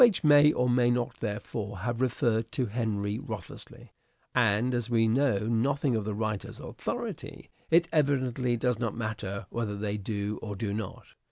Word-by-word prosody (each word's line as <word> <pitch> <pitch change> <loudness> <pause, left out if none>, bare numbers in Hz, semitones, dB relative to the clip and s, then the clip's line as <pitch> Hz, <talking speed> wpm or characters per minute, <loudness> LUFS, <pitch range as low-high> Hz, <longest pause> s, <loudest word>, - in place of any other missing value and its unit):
may 150 0 +7
or 125 -3 +1
may 120 0 +4
not 120 0 -1
therefore, 105 -1 -4
have 120 +5 -2
referred 115 -3 +1
to 130 - 0
Henry 105 -2 -1
Wriothesley; 105 -8 -8 0.4
and, 120 0 +3
as 120 -1 -1
we 115 -2 +3
know 120 -2 +2
nothing 125 +3 +1
of 110 -2 -1
the 105 -1 -2
writer's 110 -1 -3
authority, - - -5 0.2
it 170 +1 +5
evidently 130 -5 +2
does 125 -1 0
not 115 -3 -2
matter 105 -4 -4
whether 110 -3 -2
they 105 0 -2
do 105 0 -3
or 105 -2 -5
do 100 0 -2
not. 110 +1 -6
115 Hz, 160 wpm, -29 LUFS, 105-125 Hz, 0.4 s, may